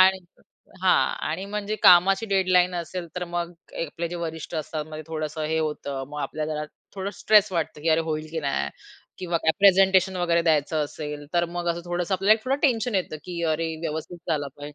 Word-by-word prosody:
आणि 190 0 +6 0.6
हां, 185 - +4 0.2
आणि 185 +5 -3
म्हणजे 210 +1 -3
कामाची 190 +5 +6
डेडलाईन 185 -2 +3
असेल 175 +1 -4
तर 180 - -2
मग 175 0 -2 0.3
आपले 165 +3 -4
जे 175 - -5
वरिष्ठ 160 -1 -5
असतात 155 -1 -3
मग 155 - -6
थोडंसं 155 -1 -4
हे 160 +1 0
होतं 140 -3 -3
मग 150 0 -5
आपल्याला 155 0 -3
जरा 150 0 -3 0.3
थोडं 195 +1 -3
स्ट्रेस 210 -2 +5
वाटतं 160 -3 -2
की 165 - 0
अरे 160 +1 +4
होईल 155 -1 -3
की 160 -1 -3
नाही 70 - -1 0.5
किंवा 175 -2 -1
काय 160 - +2
प्रेझेंटेशन 190 -1 +5
वगैरे 170 -1 +2
द्यायचं 155 -1 +2
असेल 150 0 -6
तर 175 0 +3
मग 175 0 -4
असं 170 0 -1
थोडंसं 175 +2 -1
आपल्याला 205 +4 +4
थोडं 270 +2 0
टेन्शन 240 -5 +2
येतं 180 -4 -1
की 170 -1 -5
अरे 160 +1 -2
व्यवस्थित 160 +2 -4
झालं 145 -3 0
पाहिज 145 0 -9
170 Hz, 190 wpm, -25 LUFS, 155-190 Hz, 0.6 s, आणि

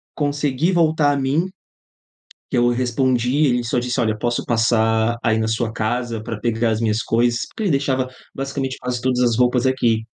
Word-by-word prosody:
consegui 145 +2 0
voltar 155 -4 +3
a 140 - 0
mim, 140 +6 0 1.0
que - - -1
eu 120 0 +4
respondi, 125 +3 +1
ele 120 -2 +1
só 120 - -1
disse: 120 0 -1
"Olha, 110 -2 +1
eu 105 - -8
posso 120 +1 -1
passar 110 0 +2
aí 110 -1 +2
na 110 0 0
sua 110 0 -1
casa 115 0 -2
pra 110 0 -5
pegar 115 -1 0
as 110 +1 -1
minhas 110 0 0
coisas?", 120 +1 +1
porque 220 - -6
ele 190 - +1
deixava 135 -2 0 0.3
basicamente 135 -1 -3
quase 125 -1 -3
todas 125 0 0
as 120 -2 +2
roupas 125 0 +2
aqui. 120 -4 +1
125 Hz, 190 wpm, -20 LUFS, 115-135 Hz, 1.0 s, eu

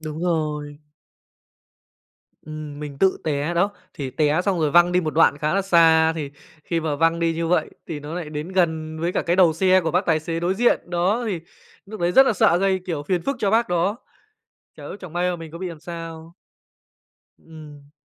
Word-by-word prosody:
Đúng 155 0 -6
rồi. 150 -3 -2 1.7
Ừm, 155 -1 -8
mình 145 -2 -7
tự 190 -1 +2
té 150 +2 -1
đó. 195 +4 +2 0.2
Thì 135 -3 -5
té 150 +5 +1
xong 185 -4 0
rồi 150 -2 +1
văng 175 +2 +5
đi 180 - +3
một 155 -3 -3
đoạn 155 -3 +4
khá 155 +4 -1
là 195 - +1
xa, 165 -3 +4
thì 145 -3 -4 0.3
khi 170 -1 -1
mà 155 -2 -2
văng 165 +2 +2
đi 165 -1 0
như 165 0 -2
vậy 180 - +1 0.2
thì 150 -2 -5
nó 150 +3 -7
nại 165 -4 -5
đến 150 +3 -5
gần 160 -3 0
với 170 +2 -1
cả - - 0
cái 175 0 0
đầu 175 -4 +5
xe 185 +3 +3
của 160 -2 -2
bác 180 +4 0
tài 160 -2 +2
xế 165 +1 -4
đối 180 +2 0
diện. 240 +4 +2
Đó, 185 +7 +1
thì 185 -6 -2 0.5
núc 215 0 -9
đấy 175 +1 +1
rất 270 0 +7
là - - +3
sợ 175 -3 +3
gây, 190 0 +1
kiểu, 160 -5 -3
phiền 175 +2 -1
phức 275 -1 -2
cho 200 - 0
bác 225 0 +2
đó, 180 +5 0 0.8
chả - - -12 0.2
chẳng 180 -4 -10
may 180 +1 0
mà 175 - -3
mình 165 -1 -9
có 170 - -9
bị 185 -1 -4
làm 160 -3 -10
sao. 165 0 -9 1.0
Ừm. 150 -3 -14
165 Hz, 215 wpm, -22 LUFS, 155-180 Hz, 1.7 s, rất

